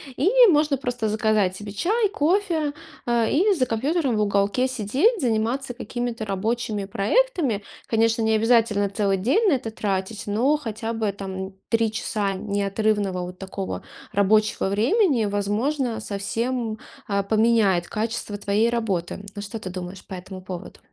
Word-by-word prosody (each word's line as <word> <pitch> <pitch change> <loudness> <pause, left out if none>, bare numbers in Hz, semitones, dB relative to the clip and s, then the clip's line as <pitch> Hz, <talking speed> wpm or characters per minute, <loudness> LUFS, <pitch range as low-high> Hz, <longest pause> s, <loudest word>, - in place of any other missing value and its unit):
И 310 +9 +2 0.2
можно 300 -5 +3
просто 245 -4 -2
заказать 210 -3 +1
себе 205 0 -8
чай, 420 - +1
кофе, 340 -4 +1 0.3
а, 235 -1 +2
и 390 - +3
за 275 -9 +1
компьютером 265 +3 0
в 215 - +1
уголке 205 +5 +1
сидеть, 260 - +1
заниматься 245 +1 0 0.2
какими-то 240 -2 -3
рабочими 210 +1 -2
проектами. 235 - +1 0.2
Конечно, 225 0 +2
не 220 0 +2
обязательно 220 -2 +3
целый 200 -1 +1
день 270 - +2
на - - +4
это 245 -4 -2
тратить, 200 0 -3
но 240 +9 +2
хотя 225 -4 -4
бы 220 -2 0
там 190 -1 -6 0.2
3 230 -1 +2
часа 210 -3 -1
неотрывного 200 -1 0
вот 180 +1 -8
такого 195 0 -5 0.3
рабочего 210 0 +2
времени, 245 - +2
возможно, 220 +5 -1
совсем, 225 +3 -2 0.3
а, 200 -1 0
поменяет 215 -4 +3
качество 220 -1 -3
твоей 210 +3 +1
работы, 210 -8 -1 0.2
м? 205 - -5
Что 205 +3 -6
ты 185 -3 -6
думаешь 185 +1 -7
по - - -9
этому 185 +1 -8
поводу? 185 -2 -8
220 Hz, 145 wpm, -24 LUFS, 200-245 Hz, 0.3 s, на